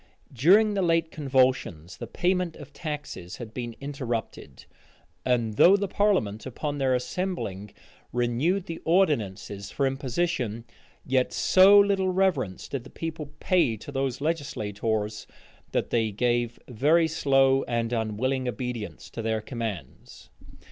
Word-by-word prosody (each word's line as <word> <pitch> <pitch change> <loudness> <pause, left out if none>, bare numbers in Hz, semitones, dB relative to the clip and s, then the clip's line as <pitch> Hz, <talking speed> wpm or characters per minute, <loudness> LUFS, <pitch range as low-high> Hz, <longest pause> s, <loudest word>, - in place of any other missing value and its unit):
During 195 - +5
the 200 - 0
late 165 -2 +1
convulsions, 130 - 0
the 120 - -7
payment 180 +4 0
of 145 -1 -12
taxes 145 - -6
had 115 -2 -9
been 120 -2 -5
interrupted; 130 -5 -5 0.6
and 115 -4 0
though 195 +3 +7
the 200 0 -2
parliament, 180 - 0
upon 145 +3 -4
their 130 -1 +2
assembling, 125 - -3 0.4
renewed 125 +11 0
the 165 - -6
ordinances 110 - 0
for 140 - -1
impositions, 130 -4 -2 0.4
yet 130 -1 +1
so 195 +2 +6
little 200 -2 +3
reverence 180 - 0
did 135 -4 -4
the - - -12
people 160 -3 -6
pay 170 -12 +2
to 130 - -10
those 135 -1 -2
legislators, 110 -8 -2 0.4
that - - -1
they 115 -2 +2
gave 120 +2 0
very 150 +8 +3
slow 135 -4 +3
and 115 -1 -1
unwilling 120 +4 -1
obedience 125 -2 -5
to 115 - -5
their 110 0 0
commands. 110 -3 -7
130 Hz, 130 wpm, -26 LUFS, 115-165 Hz, 0.6 s, though